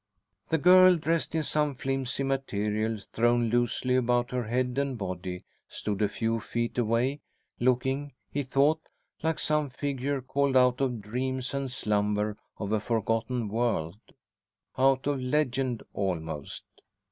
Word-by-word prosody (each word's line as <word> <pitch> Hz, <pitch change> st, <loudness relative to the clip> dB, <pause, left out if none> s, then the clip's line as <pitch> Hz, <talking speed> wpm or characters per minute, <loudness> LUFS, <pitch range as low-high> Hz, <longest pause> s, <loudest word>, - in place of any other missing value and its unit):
The 160 Hz, -, +3 dB
girl, 185 Hz, +3 st, +7 dB
dressed 165 Hz, 0 st, -1 dB
in 160 Hz, -, +1 dB
some 150 Hz, -1 st, 0 dB
flimsy 135 Hz, 0 st, -2 dB
material 110 Hz, -5 st, -1 dB, 0.2 s
thrown 120 Hz, 0 st, +2 dB
loosely 120 Hz, +1 st, +1 dB
about 120 Hz, -1 st, +2 dB
her 125 Hz, -2 st, -1 dB
head 125 Hz, +3 st, 0 dB
and 140 Hz, -3 st, -1 dB
body, 90 Hz, -2 st, -5 dB, 0.3 s
stood 105 Hz, -1 st, -3 dB
a 105 Hz, -, +3 dB
few 115 Hz, +2 st, -1 dB
feet 120 Hz, +2 st, -2 dB
away, 120 Hz, +5 st, +1 dB, 0.4 s
looking, 130 Hz, +3 st, +1 dB, 0.2 s
he 145 Hz, -, -1 dB
thought, 140 Hz, +4 st, +2 dB, 0.4 s
like 160 Hz, 0 st, 0 dB
some 150 Hz, -2 st, 0 dB
figure 140 Hz, +1 st, -2 dB
called 135 Hz, +1 st, +1 dB
out 125 Hz, 0 st, +4 dB
of 125 Hz, -5 st, 0 dB
dreams 130 Hz, +4 st, -2 dB
and 140 Hz, -2 st, -2 dB
slumber 105 Hz, -3 st, 0 dB, 0.2 s
of 100 Hz, -1 st, -4 dB
a 110 Hz, -, +2 dB
forgotten 115 Hz, +2 st, -1 dB
world, 105 Hz, -5 st, -1 dB, 0.8 s
out 135 Hz, 0 st, +3 dB
of 145 Hz, -1 st, 0 dB
legend 130 Hz, -2 st, 0 dB
almost. 80 Hz, -6 st, -3 dB
125 Hz, 135 wpm, -28 LUFS, 110-140 Hz, 0.8 s, girl